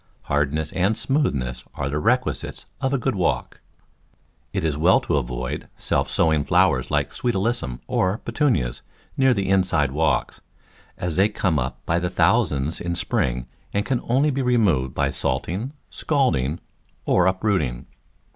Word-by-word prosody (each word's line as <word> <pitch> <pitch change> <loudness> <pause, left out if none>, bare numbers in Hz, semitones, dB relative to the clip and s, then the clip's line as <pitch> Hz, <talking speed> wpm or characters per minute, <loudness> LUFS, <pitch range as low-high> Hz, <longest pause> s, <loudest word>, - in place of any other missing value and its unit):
Hardness 75 +2 0
and 95 +4 +1
smoothness 70 - -1
are 70 - -2
the 75 +1 -1
requisites - - 0 0.2
of 130 -1 0
a 140 - +2
good 130 +1 -1
walk. 90 -4 -1 0.9
It - - -2
is 80 -3 0
well 85 +6 +4
to - - 0
avoid 60 -2 -3
self - - 0
sowing 80 -3 +2
flowers - - +2
like - - 0
Sweet 120 -3 -1
Alyssum, 95 - -1
or 95 +3 +1
Petunias, 70 - 0 0.3
near 130 -2 +4
the 100 -2 -1
inside 90 -7 +2
walks, 70 -4 0 0.6
as 90 -2 -3
they 100 +3 +4
come 90 -7 0
up - - -4
by 85 +1 +1
thousands 85 - +1
in 85 0 -2
the - - -4
spring - - -1 0.3
and 100 - +1
can 130 -3 0
only 135 +5 +2
be 135 0 -1
removed 100 - +2
by - - +1
salting, 105 - -2 0.2
scalding 115 - 0 0.5
or 90 0 +3
uprooting. 95 - 0
90 Hz, 150 wpm, -23 LUFS, 70-110 Hz, 0.9 s, well